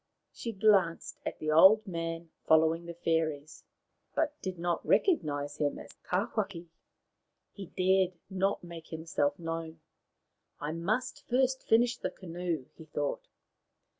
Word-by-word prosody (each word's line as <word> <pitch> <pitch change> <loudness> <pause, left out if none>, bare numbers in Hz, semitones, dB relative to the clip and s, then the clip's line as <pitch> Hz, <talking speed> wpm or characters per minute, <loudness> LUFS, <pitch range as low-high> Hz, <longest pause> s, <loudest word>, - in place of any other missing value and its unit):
She 230 - -5
glanced 195 -5 +2
at - - -3
the 155 0 -2
old 190 +8 +7
man 165 -2 -4 0.2
following 160 +2 +4
the 170 - -6
fairies, 160 -3 -1 0.5
but 310 -2 +1
did 185 -1 -4
not 170 0 -1
recognize 145 - +1
him 145 -1 0
as - - -10 0.2
Tawhaki. 195 -2 -1 0.8
He 195 -3 -8
dared 185 0 +2
not 190 0 0
make 170 -2 -9
himself 160 -3 -1
known. 165 -1 -5 0.4
" - - -50
I 150 +1 -3
must 215 +10 -2
first 260 +1 +2
finish 240 +2 +3
the - - -2
canoe," 170 -5 -4
he 160 - -13
thought. 145 -2 -3
170 Hz, 135 wpm, -31 LUFS, 160-195 Hz, 0.8 s, old